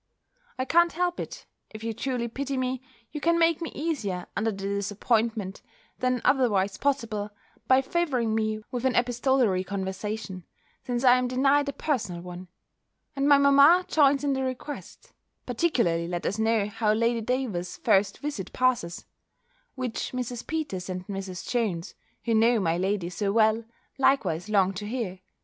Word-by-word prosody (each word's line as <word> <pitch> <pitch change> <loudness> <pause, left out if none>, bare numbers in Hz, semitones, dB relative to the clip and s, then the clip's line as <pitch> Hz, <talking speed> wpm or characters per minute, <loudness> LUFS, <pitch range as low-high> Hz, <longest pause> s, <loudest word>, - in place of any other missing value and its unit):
I 255 - -1
can't 340 +4 +4
help 355 +1 -1
it - - -7 0.2
if 215 0 -10
you 225 0 -2
truly 245 +1 -2
pity 275 +3 -3
me 255 0 -1 0.3
you 300 - -5
can 335 +2 +3
make 335 0 +3
me 330 - -4
easier 225 - -2
under 220 +2 +1
the 205 - -5
disappointment, 205 +1 -1 0.4
than 255 -1 0
otherwise 205 -8 +2
possible, 220 -7 -1 0.4
by 260 +1 +5
favouring 265 -8 0
me 215 -1 -1
with 245 -1 -3
an 260 -1 +1
epistolary 245 -5 +2
conversation, 190 0 -4 0.4
since 245 0 -2
I 250 -1 +6
am 250 - 0
denied 275 +3 +2
a - - -4
personal 210 - -2
one; 180 0 -8 0.7
and 275 +1 +1
my 285 - +8
mamma 280 +6 +6
joins 285 -2 +4
in 285 -1 +1
the 265 - -1
request; 260 +3 -6 0.3
particularly 235 - +1
let 175 0 -4
us 200 - -1
know 220 -2 +2
how 210 +1 +1
Lady 230 +1 +1
Davers's 220 -7 -2
first 200 -4 +2
visit 285 -11 -5
passes; 245 -10 0 0.7
which 255 -3 -3
Mrs. 245 -1 -4
Peters 290 - -3
and 180 0 -4
Mrs. 195 -2 -6
Jones, 205 -9 -1 0.3
who 230 - +1
know 225 +1 +4
my 165 -4 +1
lady 185 0 -1
so 200 +2 -1
well, 220 +1 +3 0.3
likewise 215 - +2
long 195 -2 +3
to 205 +2 -6
hear. 215 -6 -3
230 Hz, 160 wpm, -27 LUFS, 200-265 Hz, 0.7 s, my